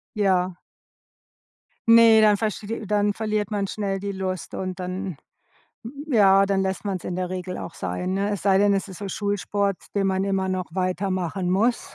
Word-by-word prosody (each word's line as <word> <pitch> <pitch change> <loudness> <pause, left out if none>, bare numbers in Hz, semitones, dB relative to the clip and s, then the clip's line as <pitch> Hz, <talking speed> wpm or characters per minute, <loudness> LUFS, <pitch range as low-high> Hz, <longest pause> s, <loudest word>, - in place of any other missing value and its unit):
Ja. 185 -3 +1 1.3
Ne, 230 -1 +7
dann 210 -1 +5
versteh 215 0 -3
dann 205 0 +2
verliert 215 -1 -2
man 205 -2 -1
schnell 195 -1 -3
die 200 0 -3
Lust 185 -2 -4
und 185 0 -4
dann 185 -1 -4 0.9
ja, 195 -6 +5
dann 195 -1 +1
lässt 190 +1 -3
man's 190 -4 -3
in 180 - -3
der 185 -1 -3
Regel 185 0 -4
auch 165 - -7
sein, 95 - -3
ne? 200 +1 0
Es 205 - -3
sei 195 -1 +4
denn, 200 0 +4
es 195 - -2
ist 190 - -9
so 200 - -5
Schulsport, 200 0 -1 0.2
den 195 -1 +1
man 190 0 0
immer 190 -1 0
noch 185 -1 -2
weitermachen 185 0 -1
muss, 225 +6 0
195 Hz, 175 wpm, -24 LUFS, 185-205 Hz, 1.3 s, Ne